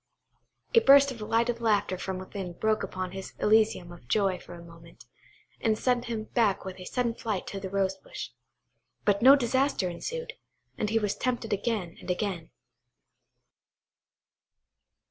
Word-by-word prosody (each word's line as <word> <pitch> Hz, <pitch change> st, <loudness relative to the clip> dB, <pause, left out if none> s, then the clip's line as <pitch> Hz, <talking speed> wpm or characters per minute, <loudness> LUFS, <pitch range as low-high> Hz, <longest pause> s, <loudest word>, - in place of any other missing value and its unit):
A 460 Hz, -, +8 dB
burst 280 Hz, -6 st, +7 dB
of 240 Hz, -, -8 dB
delighted 230 Hz, +2 st, 0 dB
laughter 205 Hz, -4 st, +2 dB
from 185 Hz, +1 st, -4 dB
within 185 Hz, -1 st, -6 dB
broke 220 Hz, +4 st, 0 dB
upon 185 Hz, -1 st, -4 dB
his 190 Hz, 0 st, -7 dB
elysium 215 Hz, -5 st, +2 dB
of 175 Hz, -8 st, -14 dB
joy 190 Hz, -, +1 dB
for 175 Hz, -, -11 dB
a 170 Hz, -, -11 dB
moment, 170 Hz, 0 st, -15 dB, 0.5 s
and 220 Hz, -2 st, +1 dB
sent 245 Hz, 0 st, +1 dB
him 230 Hz, -2 st, -3 dB
back 215 Hz, -4 st, +1 dB
with 190 Hz, 0 st, -7 dB
sudden 245 Hz, -2 st, 0 dB
flight 215 Hz, -5 st, -3 dB
to 195 Hz, -, -5 dB
the 190 Hz, -1 st, -5 dB
rose 195 Hz, 0 st, 0 dB
bush. -, -, -8 dB, 0.7 s
But 200 Hz, 0 st, +2 dB
no 265 Hz, +3 st, +9 dB
disaster 260 Hz, -6 st, +1 dB
ensued, 480 Hz, -, -5 dB, 0.4 s
and 210 Hz, -, -1 dB
he 225 Hz, -, +2 dB
was 210 Hz, -2 st, 0 dB
tempted 245 Hz, -4 st, -2 dB
again 205 Hz, -5 st, -2 dB
and -, -, -10 dB
again. 180 Hz, -3 st, -2 dB
210 Hz, 150 wpm, -28 LUFS, 185-235 Hz, 0.7 s, no